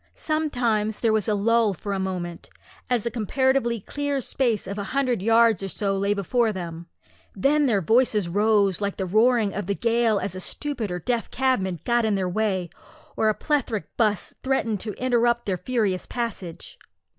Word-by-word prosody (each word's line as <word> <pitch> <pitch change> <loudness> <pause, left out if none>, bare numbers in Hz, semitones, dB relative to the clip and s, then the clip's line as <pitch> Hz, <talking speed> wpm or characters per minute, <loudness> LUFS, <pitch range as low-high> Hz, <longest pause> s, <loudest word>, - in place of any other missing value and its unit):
Sometimes 245 -9 0
there 225 -2 +3
was 215 -2 +1
a 210 - +2
lull 220 0 +2
for 200 +3 -4
a 195 - -2
moment, 180 -3 -4 0.4
as 245 -3 +1
a 235 - -1
comparatively 245 +1 +1
clear 285 +6 -2
space 240 -4 0
of 200 +2 -5
a - - -2
hundred 250 -7 +1
yards 225 -1 +4
or 195 - -3
so 195 +1 -1
lay 200 +1 +1
before 220 +4 +1
them; 170 -3 -6 0.5
then 285 +8 +3
their 210 -6 +2
voices 220 -2 +3
rose 205 +1 +2
like 200 -1 -1
the 190 - -2
roaring 220 +2 +3
of 205 -2 -4
the 200 - 0
gale 230 -1 +2
as 195 -2 -3
a - - -5
stupid 245 +2 -3
or 180 - -3
deaf 230 +6 -2
cabman 195 - 0
got 240 -1 +2
in 215 -2 +1
their 190 -2 0
way, 185 -3 -1 0.4
or 220 - +2
a 215 - +1
plethoric 240 - -2
'bus 210 -5 +1
threatened 240 -6 0
to 210 +2 -5
interrupt 240 -1 +1
their 190 -3 -1
furious 205 -4 -1
passage. 220 -8 -5
215 Hz, 180 wpm, -24 LUFS, 195-240 Hz, 0.5 s, yards